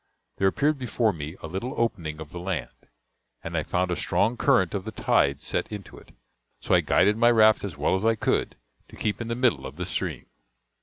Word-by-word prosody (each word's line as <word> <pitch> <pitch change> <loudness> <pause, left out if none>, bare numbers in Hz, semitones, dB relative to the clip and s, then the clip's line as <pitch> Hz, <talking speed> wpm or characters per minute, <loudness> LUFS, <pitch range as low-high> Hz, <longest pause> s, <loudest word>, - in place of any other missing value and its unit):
There 95 - +3
appeared 145 +8 +1
before 120 -3 0
me 75 0 -6
a - - -4
little 100 - -4
opening 80 -10 -2
of 80 -2 -9
the 90 - -7
land, 90 -1 -3 0.7
and - - -5
I - - +1
found 90 0 -1
a - - +1
strong 110 +7 +1
current 95 -6 +2
of 100 -2 -2
the 110 - -6
tide 70 -9 +1
set - - -2
into 105 -3 -8
it; - - -19 0.5
so - - -1
I - - +6
guided 105 +3 +3
my 120 +1 +5
raft 110 -2 +5
as 95 -7 -5
well 70 - +1
as 95 +2 0
I 115 0 +3
could, - - 0 0.3
to - - -13
keep 105 +2 -2
in 115 - -4
the 115 - -2
middle 120 - +2
of 65 +1 -8
the 90 +2 -4
stream. 90 - -3
100 Hz, 220 wpm, -26 LUFS, 85-115 Hz, 0.7 s, I